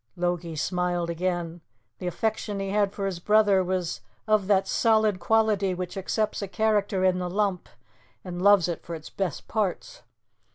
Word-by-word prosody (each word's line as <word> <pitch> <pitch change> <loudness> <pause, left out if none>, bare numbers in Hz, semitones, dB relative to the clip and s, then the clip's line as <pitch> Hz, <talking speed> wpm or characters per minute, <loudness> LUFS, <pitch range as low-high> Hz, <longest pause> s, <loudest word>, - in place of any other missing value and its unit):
Logie 175 -2 -2
smiled 175 +1 -1
again. 175 -1 -2 0.4
The 180 - -4
affection 215 +2 -2
he 195 0 -3
had 205 -1 +2
for 200 -1 -4
his 190 -3 -3
brother 205 0 +4
was 180 -2 -2 0.2
of 215 -3 +2
that 195 -2 +3
solid 220 -4 +2
quality 210 -2 +2
which 180 +1 -5
accepts 210 +3 -1
a 200 - -3
character 205 -2 +1
in 185 -1 +2
the 180 -1 -3
lump, 195 -1 -1 0.5
and 180 -1 -6
loves 200 -3 +5
it 170 - -3
for 170 - -6
its 155 -1 -10
best 185 -7 -3
parts. 220 - -2
190 Hz, 165 wpm, -26 LUFS, 175-210 Hz, 0.5 s, loves